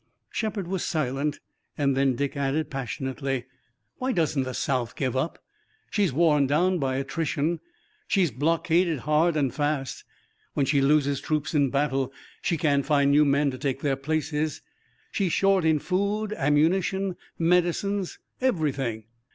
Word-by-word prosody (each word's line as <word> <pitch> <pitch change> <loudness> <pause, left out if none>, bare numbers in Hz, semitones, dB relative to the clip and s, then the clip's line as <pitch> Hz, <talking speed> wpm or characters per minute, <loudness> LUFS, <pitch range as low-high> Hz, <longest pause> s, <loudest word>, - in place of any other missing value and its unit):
Shepard 210 -5 -2
was 190 0 -2
silent 145 -2 -1 0.4
and 140 -2 +2
then 135 -1 +2
Dick 140 +3 -2
added 140 +2 -1
passionately: 135 0 -3 0.5
"Why 260 +1 -1
doesn't 160 - +1
the 130 -1 -4
South 125 -4 -1
give 130 -3 -1
up? 135 +6 -1 0.5
She's 200 -6 +2
worn 150 -1 +3
down 175 +6 +2
by 135 -2 0
attrition. 155 +3 -1 0.5
She's 185 -7 +2
blockaded 165 +3 +1
hard 155 +3 +2
and 135 -5 +1
fast! 145 -2 -2 0.5
When 140 - +2
she 140 +1 +2
loses 140 -1 +2
troops 155 0 -1
in 145 -3 +3
battle 135 -1 0 0.3
she 170 - 0
can't 140 -2 +2
find 140 -1 +3
new 150 +1 +5
men 140 0 +2
to 130 - -8
take 135 -1 -2
their 140 -2 +1
places! 155 +1 -2 0.5
She's 185 -5 0
short 195 -3 +3
in 160 -1 +4
food, 200 +6 -1
ammunition, 180 +5 +1 0.2
medicines, 180 +3 +1 0.2
everything! 140 - 0
150 Hz, 145 wpm, -26 LUFS, 135-170 Hz, 0.5 s, new